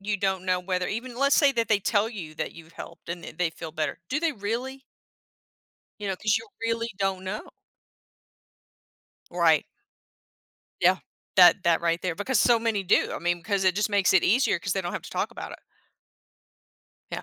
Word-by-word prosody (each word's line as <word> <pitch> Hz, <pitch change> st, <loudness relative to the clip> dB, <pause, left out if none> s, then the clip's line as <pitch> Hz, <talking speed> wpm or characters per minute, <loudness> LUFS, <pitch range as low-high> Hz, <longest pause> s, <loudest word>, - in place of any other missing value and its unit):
you 205 Hz, +1 st, -1 dB
don't 190 Hz, -1 st, -1 dB
know 185 Hz, -1 st, +1 dB
whether 180 Hz, 0 st, -2 dB
even 240 Hz, +3 st, -5 dB
let's 280 Hz, +1 st, +3 dB
say 285 Hz, -3 st, +5 dB
that 230 Hz, -3 st, -1 dB
they 210 Hz, -2 st, +4 dB
tell 205 Hz, +2 st, +1 dB
you 170 Hz, -9 st, -8 dB
that -, -, -4 dB
you've 165 Hz, 0 st, -14 dB
helped -, -, -11 dB
and 170 Hz, 0 st, -5 dB
that 160 Hz, -, -10 dB
they 180 Hz, -2 st, +1 dB
feel 160 Hz, 0 st, -8 dB
better, 155 Hz, 0 st, -3 dB
do 290 Hz, -, 0 dB
they 330 Hz, -1 st, 0 dB
really? 245 Hz, +5 st, -4 dB, 1.2 s
You 205 Hz, -, -4 dB
know, 190 Hz, -, 0 dB
'cause 215 Hz, +3 st, +1 dB
you 225 Hz, -, -11 dB, 0.2 s
really 230 Hz, 0 st, -1 dB
don't 190 Hz, -1 st, -1 dB
know. 205 Hz, +3 st, -5 dB, 1.8 s
Right. 165 Hz, -3 st, +4 dB, 1.2 s
Yeah. -, -, +5 dB, 0.4 s
That 190 Hz, -, +7 dB
that 170 Hz, -2 st, +3 dB
right 170 Hz, 0 st, 0 dB
there, 180 Hz, -3 st, -2 dB
because 240 Hz, +6 st, +1 dB
so 240 Hz, -2 st, +5 dB
many 225 Hz, -3 st, 0 dB
do. 180 Hz, -, +2 dB
I -, -, -5 dB
mean, 175 Hz, 0 st, 0 dB
'cause 195 Hz, +3 st, 0 dB
it 185 Hz, -1 st, +4 dB
just 210 Hz, -, +1 dB
makes 200 Hz, -3 st, +3 dB
it 190 Hz, -, +4 dB
easier 245 Hz, +8 st, +3 dB
'cause -, -, -2 dB
they -, -, 0 dB
don't -, -, -4 dB
have -, -, -4 dB
to -, -, -10 dB
talk -, -, -2 dB
about -, -, -8 dB
it. -, -, -10 dB, 1.5 s
Yeah. -, -, -4 dB
200 Hz, 195 wpm, -26 LUFS, 175-230 Hz, 1.8 s, That